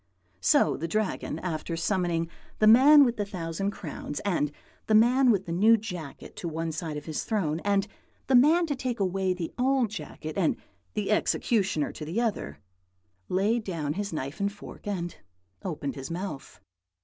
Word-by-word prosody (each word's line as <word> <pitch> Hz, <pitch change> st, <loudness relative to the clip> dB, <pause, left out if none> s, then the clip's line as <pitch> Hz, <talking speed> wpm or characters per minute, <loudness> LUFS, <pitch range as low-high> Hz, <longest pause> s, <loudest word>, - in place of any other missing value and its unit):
"So 90 Hz, -, +3 dB
the 165 Hz, -, -3 dB
Dragon, 205 Hz, -5 st, -2 dB
after 165 Hz, -1 st, -3 dB
summoning 170 Hz, -1 st, 0 dB, 0.3 s
the 215 Hz, -, +3 dB
man 275 Hz, +6 st, +8 dB
with 240 Hz, -1 st, -1 dB
the 205 Hz, -, 0 dB
thousand 185 Hz, -1 st, -3 dB
crowns 150 Hz, -6 st, -6 dB
and 170 Hz, -7 st, 0 dB, 0.4 s
the 220 Hz, -, +4 dB
man 250 Hz, +4 st, +5 dB
with 195 Hz, -4 st, +3 dB
the 170 Hz, -, -5 dB
new 215 Hz, +7 st, +5 dB
jacket 180 Hz, -9 st, -8 dB
to 175 Hz, -, -4 dB
one 165 Hz, 0 st, -3 dB
side 155 Hz, -1 st, -4 dB
of 150 Hz, -, -7 dB
his 155 Hz, -2 st, -3 dB
throne, 170 Hz, -8 st, -1 dB
and 200 Hz, +1 st, +1 dB, 0.4 s
the 265 Hz, -, 0 dB
man 310 Hz, +8 st, +6 dB
to 295 Hz, -3 st, -2 dB
take 255 Hz, -3 st, -3 dB
away 190 Hz, -1 st, 0 dB
the 175 Hz, -2 st, -5 dB
old 255 Hz, -3 st, +2 dB
jacket 155 Hz, -5 st, -6 dB
and 170 Hz, -, +2 dB, 0.4 s
the 210 Hz, 0 st, -1 dB
executioner 195 Hz, -7 st, +1 dB
to -, -, -8 dB
the 165 Hz, +9 st, -2 dB
other, 210 Hz, -, -2 dB, 0.7 s
laid 210 Hz, +5 st, +1 dB
down 160 Hz, -7 st, -2 dB
his 205 Hz, +3 st, -3 dB
knife 150 Hz, +1 st, -4 dB
and 200 Hz, 0 st, 0 dB
fork 205 Hz, 0 st, -11 dB
and 175 Hz, -4 st, -3 dB, 0.4 s
opened 150 Hz, -6 st, -4 dB
his 135 Hz, -1 st, -7 dB
mouth. 170 Hz, -4 st, -6 dB
190 Hz, 175 wpm, -28 LUFS, 165-220 Hz, 0.7 s, man